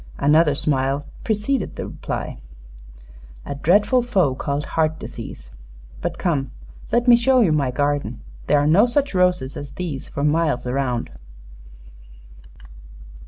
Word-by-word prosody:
Another 150 +1 +4
smile 140 -1 0 0.2
preceded 220 +2 -1
the - - -5
reply. - - -5 1.1
"A - - -4
dreadful 205 - +3
foe 190 - +1
called 140 +2 -3
heart 160 -1 0
disease. - - -9 0.5
But - - -3
come; 145 -7 -1 0.4
let 240 +1 +2
me 240 - +9
show 255 +2 +3
you 190 -8 +3
my 145 -4 +1
garden. 145 - -1 0.3
There - - +4
are 145 - +2
no 185 +10 +5
such 275 +1 0
roses 180 -8 +1
as 145 -1 -7
these 160 -7 -5
for 140 - -4
miles 150 -4 +1
around." 125 -2 -2
150 Hz, 130 wpm, -22 LUFS, 140-200 Hz, 1.1 s, me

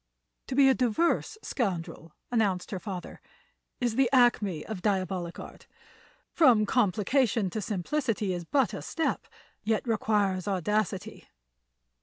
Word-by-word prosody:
"To 260 - -3
be 275 0 +6
a 265 - +6
diverse 260 - 0
scoundrel," 170 - -3 0.2
announced 205 -6 0
her 190 - -3
father, 185 -2 -7 0.6
"is 240 -3 0
the 265 -3 +4
acme 225 - +3
of 215 -4 -6
diabolic 185 -4 -1
art. - - -11 0.6
From 240 -9 +5
complication 215 -1 +1
to 215 - -3
simplicity 210 - -1
is 175 -1 -4
but 250 - +1
a - - -5
step, 320 - -2 0.4
yet 220 +2 0
requires 205 -4 +1
audacity. 205 +2 -2
210 Hz, 125 wpm, -28 LUFS, 185-245 Hz, 0.6 s, be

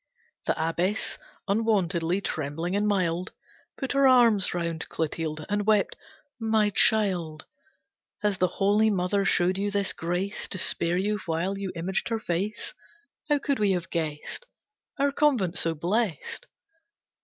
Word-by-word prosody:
The - - +2
Abbess, 175 +6 -1 0.3
unwontedly 195 -4 +1
trembling 160 +3 -3
and 205 +1 +1
mild, 180 -3 0 0.4
Put 270 - -3
her 275 -1 +4
arms 235 -6 +5
round 170 -2 -3
Clotilde 155 -1 -3
and 205 +1 -1
wept, 210 -2 +3 0.4
"My 220 -2 +2
child, 180 -8 +2 0.8
Has 205 -2 +1
the 180 - +4
Holy 210 +2 +4
Mother 195 0 +1
showed 185 0 +2
you 205 +1 0
this 200 -1 0
grace, 175 +4 -3
To - - -1
spare 175 -1 +1
you 210 +3 0
while 170 +4 -1
you 195 -1 -4
imaged 185 +6 -2
her 230 - 0
face? 200 - -2 0.6
How 295 - +4
could 280 -2 -1
we 205 -2 +3
have 175 -2 -3
guessed 160 - -4 0.5
Our 280 0 +2
convent 260 - +2
so 165 -1 +1
blessed! 195 - -2
195 Hz, 140 wpm, -27 LUFS, 170-210 Hz, 0.8 s, arms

